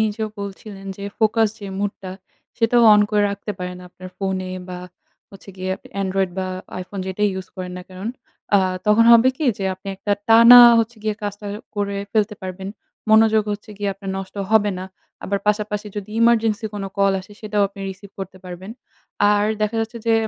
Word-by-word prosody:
নিজেও 220 0 -1
বলছিলেন 200 0 -8
যে 200 - -7
ফোকাস 220 0 +3
যে 205 - -8
মুডটা 200 -2 -4 0.5
সেটাও 235 +1 +3
অন 210 - +5
করে 210 -1 +2
রাখতে 200 +1 -5
পারেন 180 0 -5
আপনার 185 +1 -11
ফোনে 190 -1 -2 0.2
বা 180 -1 -6 0.5
হচ্ছে 195 0 -13
গিয়ে 185 0 -2 0.3
Android 190 -1 0
বা 190 - -1 0.4
iPhone 190 +1 -6
যেটাই 205 +2 0
ইউস 190 0 -6
করেন 180 -1 -5
না - - -8
কারণ 185 +4 -6 0.5
আ - - +6 0.3
তখন 210 +2 +5
হবে 235 +2 +7
কি 310 - -1
যে 195 - -3
আপনি 190 +2 -11
একটা 205 +2 -1 0.2
টানা 230 +2 +9 0.2
হচ্ছে 230 +1 -1
গিয়ে 215 -1 -1
কাজটা 205 0 -5 0.3
করে 200 -1 -1 0.2
ফেলতে 215 -1 +1
পারবেন। 190 +1 -6 0.4
মনোযোগ 220 0 +5
হচ্ছে 205 +1 -8
গিয়ে 205 -1 -1
আপনার 195 0 -7
নষ্ট 195 -1 -8 0.2
হবে 215 -2 +4
না। 185 - -5 0.4
আবার 200 0 -1
পাশাপাশি 210 0 -1
যদি 205 0 -6
emergency 225 -1 +3
কোনো 195 -1 -4
কল 195 0 +4
আসে 190 +2 -15
সেটাও 210 -1 0
আপনি 200 0 -13
রিসিভ 190 +1 -12
করতে 190 -1 -7
পারবেন। 180 +2 -8 0.6
আর 205 0 +2 0.2
দেখা 215 +2 0
যাচ্ছে 225 +1 -4
যে 230 - +4
205 Hz, 180 wpm, -21 LUFS, 190-220 Hz, 0.6 s, টানা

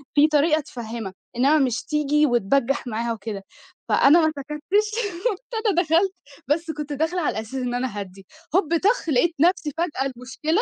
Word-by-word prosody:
في 295 +1 +6
طريقة 305 +1 +3
تفَهّمها 230 -7 -7 0.2
إنّما 280 +5 +4
مش 250 -3 0
تيجي 300 0 +2
وتبجّح 245 +2 +1
معاها، 230 +1 -2
وكده 205 -2 -6 0.5
فأنا 320 +5 +6
ما 315 - +2
سكتّش، 300 +10 -1 0.4
قُمت 410 -3 -2 0.3
أنا 360 -3 +3
دخلت 345 +4 +2 0.3
بس 320 +3 0
كنت 300 -1 -5
داخلة 320 +5 -1
على 290 - -1
أساس 225 +4 -10
إن 250 -2 -2
أنا 250 +1 -1
أهَدّي 195 0 -9 0.3
هوب 335 -3 +3
طاخ 400 -2 +1
لقيت 310 +5 +2
نفسي 355 -3 +2
فجأة 295 -6 -1
المشكلة 300 - -1
295 Hz, 165 wpm, -23 LUFS, 245-330 Hz, 0.5 s, في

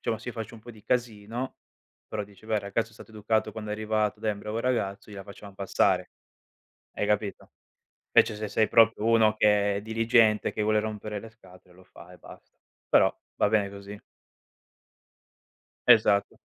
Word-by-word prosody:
diciamo, 110 - -2
se 125 - -9
io 125 - -6
faccio 115 0 -6
un 110 - -13
po' 120 - -11
di 105 -1 -17
casino 115 +1 -3 0.5
però 105 -1 -3
dice: 100 0 -19
"Beh, 110 - -1
il 105 - +1
ragazzo 110 +3 -2
è - - -20
stato 115 - -14
educato 110 +1 -1
quando 105 -1 -7
è - - -1
arrivato, 110 -1 -1
dai 110 - 0
è - - 0
un 100 - -9
bravo 105 +2 -4
ragazzo, 110 -5 -2
gliela 100 -1 -8
facciam 100 -1 -12
passare", 100 -1 +1 0.8
hai 105 - -2
capito? 105 -1 -2 0.6
Invece 105 - +5
se 105 0 -4
sei 110 +1 +1
proprio 115 -2 +4
uno 110 -2 +4
che 105 -1 +3
è - - -5
diligente, 115 0 +2
che 105 - -2
vuole 105 0 +2
rompere 105 -1 -5
le 115 - -11
scatole, 90 -4 -19
lo 95 - -18
fa 90 -1 -15
e 90 - -15
basta, - - -15 0.3
però - - +5 0.3
va 105 - +3
bene 105 -2 +2
così. 100 +1 -10 1.9
Esatto. 105 -4 +4
105 Hz, 185 wpm, -27 LUFS, 100-110 Hz, 1.9 s, Invece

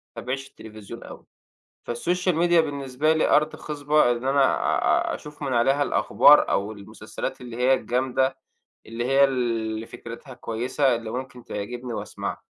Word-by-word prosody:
باتابعش 135 +2 -4
التليفزيون 110 +1 -11
أوي، - - -11 0.6
فالsocial 180 +9 0
media 170 +1 +3
بالنسبة 145 0 0
لي 160 - +1
أرض 150 +1 +3
خصبة 150 -3 +1
إن 120 +1 -3
أنا 140 0 +4 0.7
آآ - - -2
أشوف 150 0 -12
من 135 -2 -1
عليها 135 +5 +3
الأخبار 150 +1 +5
أو 100 +2 0
المسلسلات 100 +3 -7
اللي 120 -2 -8
هي 125 +2 +4
الجامدة، 130 +1 0 0.5
اللي 115 +2 -4
هي 135 +2 +4
ال 140 - +5 0.4
اللي 110 +1 -5
فكرتها 120 +4 -10
كويسة، 125 +3 0
اللي 115 -1 -6
ممكن 125 -1 -6
تعجبني 120 +4 -5
وأسمعها. - - -5
130 Hz, 150 wpm, -24 LUFS, 120-145 Hz, 0.7 s, الأخبار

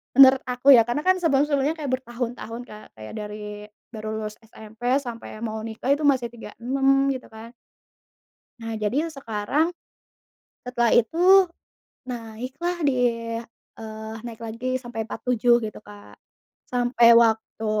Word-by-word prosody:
menurut 265 -1 +8
aku 255 +2 +5
ya, 230 - +6
karena 250 +5 -1
kan 370 - +6
sebelum-sebelumnya 285 -1 +2
kayak 290 -4 -4
bertahun-tahun 240 -1 -5
Kak, 215 0 -11
kayak 110 0 -9
dari 210 0 -7 0.3
baru 215 -1 -6
lulus 215 -1 -5
SMP, 220 0 -15 0.2
sampai 235 -4 -8
mau 220 -1 -3
nikah 225 +3 -6
itu 300 - -6
masih 260 -4 +2
36 270 +4 0
gitu 260 - -8
kan. 225 +1 -11 1.1
Nah 225 0 -5
jadi 270 +10 0
sekarang, 265 +7 -1 0.9
setelah 240 -2 +1
itu 240 +8 +2 0.9
naik 240 +1 -6
lah 350 0 0
di, 275 - +3 0.8
eee, 220 0 -8
naik 230 -2 -8
lagi 235 +3 -3
sampai 240 -3 -5
47 240 +1 +1
gitu 215 - -7
Kak, 205 0 -14 0.6
sampai 245 -1 +3 0.2
waktu 220 0 -1
235 Hz, 130 wpm, -24 LUFS, 220-260 Hz, 1.1 s, menurut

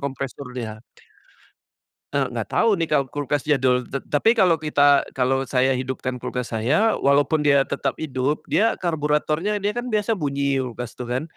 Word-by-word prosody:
kompresornya. 125 -5 -6 1.3
Eee, 135 -2 +1
nggak 115 -3 -4
tahu 230 - +3
nih 165 - 0
kalau 145 -3 +2
kulkas 145 0 -2
jadul. 130 -3 +2
T 140 +3 -5
tapi 150 +10 +2
kalau 180 -3 +5
kita 145 -2 +4
kalau 135 +1 0
saya 130 0 +1
hidupkan 130 -1 -4
kulkas 125 -2 -4
saya, 145 - +2
walaupun 145 +2 +2
dia 140 -2 +4
tetap - - -3
hidup, 140 -1 -2
dia 225 +2 +1
karburatornya 160 +4 0
dia 205 +1 -2
kan 240 0 -4
biasa 215 +1 +1
bunyi 140 -5 -1
kulkas 120 -1 -6
tuh 120 -1 -7
kan? 125 +3 -1
140 Hz, 160 wpm, -22 LUFS, 130-155 Hz, 1.3 s, kalau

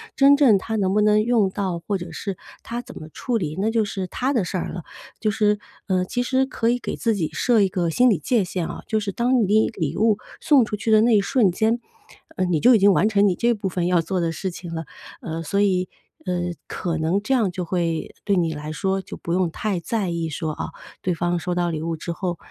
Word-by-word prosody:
真 280 +1 +6
正 255 -8 +6
她 220 +3 -3
能 190 -2 +1
不 210 - +3
能 210 0 +4
用 220 -3 +2
到， 190 -2 -2
或 205 - 0
者 175 -2 -8
是 195 +2 -4 0.3
她 235 +1 -4
怎 - - -12
么 155 - -9
处 245 +9 -3
理， 155 -7 -3
那 210 +3 +1
就 225 -1 +2
是 195 -2 -4
她 255 +8 -1
的 235 -9 +1
事 185 - -3
儿 175 - -3
了。 180 - -6 0.4
就 215 - 0
是， 210 0 +2 0.3
呃， 185 -2 +1
其 245 +6 -2
实 260 +1 -1
可 230 -3 -1
以 245 - +2
给 - - -4
自 225 -2 0
己 165 -6 -1
设 240 -4 +3
一 195 - +4
个 180 -3 -1
心 250 +10 +4
理 200 -9 +2
界 225 - +1
限 180 -2 -3
哦， - - -7
就 220 - +1
是 200 -1 -3
当 240 +3 +2
你 215 +2 +3
礼 165 -9 -2
物 215 0 +3 0.2
送 285 -5 +5
出 210 - -3
去 215 +2 -2
的 215 0 +6
那 230 0 +4
一 - - +3
瞬 210 -2 +2
间， 220 +6 +1 0.6
呃， 185 - 0
你 175 -3 +1
就 245 +9 +6
已 - - +4
经 200 0 +6
完 205 - +3
成 205 -1 +4
你 185 - +1
这 235 +5 +2
部 205 -3 -3
分 175 -1 -1
要 180 -2 +3
做 180 +3 -2
的 165 -1 0
事 190 +3 -4
情 170 -1 -8
了。 160 0 -4 0.4
呃， 165 0 -4
所 200 +5 -1
以 185 -3 +2 0.4
呃， 180 -1 -1 0.3
可 170 -2 -3
能 165 +5 0
这 240 +6 -1
样 225 -8 +2
就 180 0 -4
会 170 -2 -2
对 200 - +1
你 170 -3 +1
来 150 0 -6
说， 190 +5 -1
就 - - -9
不 170 - -4
用 180 -1 +2
太 200 +1 -2
在 200 +2 -2
意 170 -1 -2
说， 155 +2 -3
哦， - - -5 0.3
对 180 - 0
方 175 +1 0
收 175 +2 -3
到 175 -1 +1
礼 155 -2 -3
物 165 0 -2
之 170 - -5
后， 175 0 -3
190 Hz, 275 characters per minute, -23 LUFS, 175-220 Hz, 0.6 s, 真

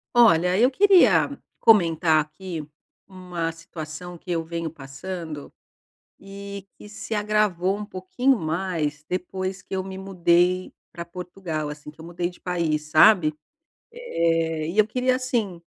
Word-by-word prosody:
Olha 180 -6 +5
eu 250 - +5
queria 255 - +5 0.2
comentar 165 -7 +4
aqui 160 +1 -7 0.4
uma 180 -3 -4
situação 165 +1 -8
que 175 - -15
eu 165 -2 0
venho 165 0 -4
passando 150 +2 -7 0.7
e 200 0 -9
que 210 - -13
se 215 +1 -6
agravou 205 -3 +1
um 210 - -5
pouquinho 215 +7 0
mais 155 -3 -2
depois 185 +1 -3
que 190 - -6
eu 190 - -1
me 190 0 -7
mudei 180 -1 +2 0.2
pra 170 - -7
Portugal, 170 -3 -5
assim, 150 0 -9
que 155 - -16
eu - - -10
mudei 175 0 -3
de 175 - -11
país, 160 -4 -1
sabe. 155 -2 +6 0.6
Eh, 165 - -1
e 175 - -5
eu 215 - +6
queria, 255 +2 +1
assim, 225 -9 -2
180 Hz, 140 wpm, -24 LUFS, 165-195 Hz, 0.7 s, sabe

